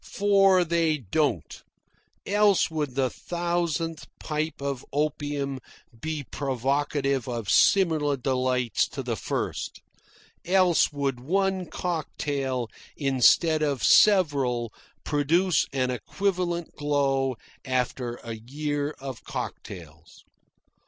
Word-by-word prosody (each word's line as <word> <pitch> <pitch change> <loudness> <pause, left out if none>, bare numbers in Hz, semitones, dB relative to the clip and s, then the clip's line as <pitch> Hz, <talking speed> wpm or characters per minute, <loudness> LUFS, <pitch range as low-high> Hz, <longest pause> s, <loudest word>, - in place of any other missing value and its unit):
For 195 -3 +4
they 165 -2 +1
don't, 135 - -1 0.6
else 205 -3 +3
would 150 -5 -3
the 130 -2 +1
thousandth 170 -2 -2
pipe 155 +1 -3
of 140 -2 -3
opium 145 -2 -2 0.4
be 155 -2 -3
provocative 135 0 -1
of 115 -4 -3
similar 155 -7 +3
delights 125 -2 0
to - - -6
the - - -2
first, - - -4 0.6
else 185 -3 +3
would 140 -3 -2
one 190 +6 0
cocktail, 145 -7 -3 0.3
instead 145 +4 +4
of 145 -4 0
several, 140 - +4 0.3
produce 160 +4 +2
an 130 -2 0
equivalent 175 +4 -2
glow 135 -3 0 0.3
after 125 -2 -2
a 115 - -5
year 145 +6 -3
of 135 -3 -7
cocktails. 85 -3 -8
145 Hz, 100 wpm, -26 LUFS, 130-170 Hz, 0.6 s, For